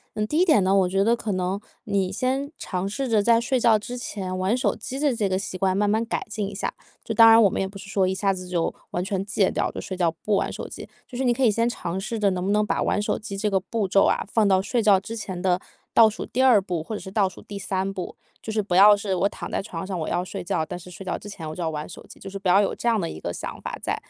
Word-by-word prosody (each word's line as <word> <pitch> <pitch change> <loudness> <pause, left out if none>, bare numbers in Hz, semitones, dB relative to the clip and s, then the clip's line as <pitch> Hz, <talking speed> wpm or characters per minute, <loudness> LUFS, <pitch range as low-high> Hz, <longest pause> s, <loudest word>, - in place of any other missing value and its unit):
嗯， 210 0 -1
第 300 - -1
一 360 - +5
点 310 - +4
呢， 190 +1 +3
我 190 -2 +3
觉 195 +2 +1
得 235 +1 +4
可 220 -3 -4
能 185 +1 -1 0.3
你 195 -3 0
先 265 +7 -1
尝 185 0 -3
试 265 +7 -3
着 215 -4 +2
在 230 0 +5
睡 255 +2 0
觉 230 -3 +4
之 245 +4 -6
前 190 -6 -4
玩 190 +6 +1
手 255 - +1
机 265 +2 -6
这 285 -5 +2
这 210 -4 0
个 185 0 0
习 185 - -5
惯 185 0 +1
慢 205 0 +2
慢 220 +2 +1
改 230 - -3
进 210 -1 -3
一 - - -10
下， 195 - -3 0.3
就 225 - -4
当 230 0 +9
然 225 0 +8
我 205 - +6
们 - - -2
也 - - 0
不 195 +1 -8
是 200 - -10
说 195 -2 +2
一 185 - 0
下 195 0 +1
子 185 -1 -7
就 175 -2 -1 0.2
完 175 - -1
全 195 0 -2
戒 200 -1 +2
掉， - - -1
就 - - -6
睡 185 - -5
觉 175 -3 +2
不 205 +5 -2
玩 - - 0
手 - - -6
机。 - - -9 0.2
就 245 - -8
是 265 - -1
你 245 -1 +3
可 270 - -5
以 - - +6
先 230 +3 +1
尝 175 -6 -4
试 220 +4 -3
着 205 -1 +3
能 180 -1 -2
不 200 - +1
能 210 0 +3
把 - - 0
玩 205 - +1
手 - - -1
机 200 -2 -7
这 210 +1 0
个 195 - +2
步 200 +2 -2
骤 195 +1 +4
啊， - - +1
放 220 -1 +2
到 190 -1 +4
睡 235 +4 0
觉 200 -3 +6
之 225 +4 -7
前 190 -5 -5
的 180 0 +1 0.3
倒 225 -2 +7
数 215 - -6
第 260 +2 0
2 235 -6 +6
步， 175 -4 -3
或 220 - -7
者 - - -3
是 190 - -9
倒 195 -1 +2
数 185 - -13
第 205 - -8
3 195 0 -2
步。 185 -2 -6 0.3
就 220 - -4
是 215 - -1
不 195 -3 -2
要 205 +3 +8
是 200 -1 -2
我 190 +2 +2
躺 - - -8
在 - - -1
床 185 -4 -6
上， 185 -2 -4
我 155 - -3
要 175 +1 -1
睡 - - -6
觉， 160 -2 -1
但 180 - -6
是 180 +1 -12
睡 190 +2 -10
觉 185 - -2
之 205 - -8
前 165 -6 -7
我 155 - -6
就 180 - -6
要 165 - 0
玩 150 -1 -5
手 - - -11
机， - - -14
就 195 - -10
是 195 0 -6
不 190 -2 -1
要 195 +3 +6
有 200 - +1
这 235 - -1
样 225 -2 +2
的 170 - -1
一 - - -7
个 85 - -4
想 - - -7
法 - - -5
在。 - - 0
200 Hz, 340 characters per minute, -24 LUFS, 185-220 Hz, 0.3 s, 当